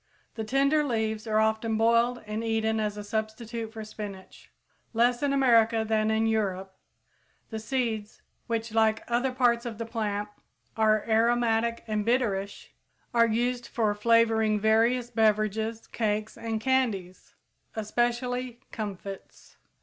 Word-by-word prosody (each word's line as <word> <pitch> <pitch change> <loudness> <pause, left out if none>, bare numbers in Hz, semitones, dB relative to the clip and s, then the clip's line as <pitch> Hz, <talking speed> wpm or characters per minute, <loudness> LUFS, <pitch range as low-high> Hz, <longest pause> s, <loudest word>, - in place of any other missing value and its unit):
The 220 - -4
tender 275 +6 +2
leaves 220 -4 -2
are 215 0 +1
often 220 0 +1
boiled 235 +2 +2
and 215 +2 -4
eaten 220 -1 0
as 210 -1 -2
a 210 - -5
substitute 220 +2 -4
for 220 -1 -7
spinach. 205 -3 -9 0.4
Less 240 +2 +2
in 285 -1 +1
America 230 -4 +4
than 215 0 +1
in 220 0 +2
Europe, 195 -4 -1 0.8
the 220 - -3
seeds, 220 -2 -3 0.2
which, 230 -1 -2
like 220 -1 +2
other 245 +2 +1
parts 245 -2 +2
of 235 -4 -6
the 230 - -4
plant, 210 -3 -2 0.5
are 215 -1 +2
aromatic 230 0 +2
and 215 -1 -1
bitterish, 205 -4 -1 0.4
are 230 -1 +5
used 240 +2 -1
for 215 -3 0
flavoring 220 0 +3
various 230 +3 +2
beverages, 220 0 +1
cakes, 215 -1 -2
and 230 -1 -3
candies, 220 -8 -1 0.4
especially 240 +2 -1
"comfits." 200 -3 -8
225 Hz, 130 wpm, -27 LUFS, 215-235 Hz, 0.8 s, are